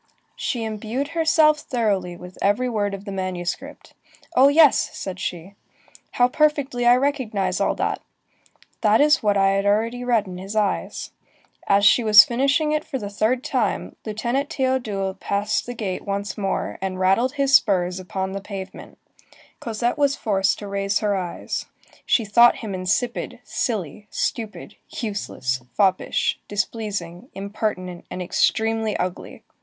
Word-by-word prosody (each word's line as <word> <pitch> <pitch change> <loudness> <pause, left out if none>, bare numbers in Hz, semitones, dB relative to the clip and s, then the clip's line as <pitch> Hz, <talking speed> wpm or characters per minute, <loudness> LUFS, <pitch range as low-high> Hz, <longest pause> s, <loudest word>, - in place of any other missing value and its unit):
She 240 -4 -2
imbued 220 +6 -3
herself 320 -2 +3
thoroughly 205 -10 -1
with 180 +1 -12
every 205 +6 +2
word 205 -4 -1
of 195 +1 -11
the 200 - -5
manuscript: 185 +8 -5 0.4
"Oh 260 +2 +7
yes!" 295 0 +5
said 185 -1 -6
she, 180 +2 -5 0.6
"how 245 - +4
perfectly 280 -3 +1
I 240 - +7
recognize 225 -9 -1
all - - +1
that! - - -2 0.8
That 215 0 +4
is 300 +1 +4
what 205 -3 +2
I 195 0 +4
had 195 +1 +1
already 230 +4 +1
read 235 -4 +2
in 180 -1 -8
his 195 +3 -7
eyes." 210 -2 -1 0.6
As 200 0 +4
she 235 +4 +6
was 215 -1 +9
finishing 275 +5 +1
it 305 0 0
for 265 - -4
the 205 -5 -6
third 230 +5 0
time, 235 -7 -1
Lieutenant 235 +6 -2
Théodule 220 -8 -1
passed 205 +3 -1
the 245 - -5
gate 200 -5 -4
once 200 0 -3
more, 195 -2 -2
and 190 -1 -3
rattled 195 +8 +2
his 275 -1 0
spurs 180 -5 +2
upon 190 0 -4
the 195 0 -5
pavement. 195 -1 -8 0.6
Cosette 235 +4 -2
was 280 -1 +3
forced 195 -5 +1
to 205 - -8
raise 200 0 0
her 205 -2 +1
eyes. 180 -3 -4 0.4
She 230 - +3
thought 235 +4 +6
him 205 - -4
insipid, 185 +6 -2
silly, 205 - -3
stupid, 225 -3 -4
useless, 200 - -3
foppish, 190 -3 +1
displeasing, 205 -1 -4
impertinent, 195 -3 -4
and - - -6
extremely 220 +4 +1
ugly. 180 0 -5
210 Hz, 150 wpm, -23 LUFS, 195-245 Hz, 0.8 s, was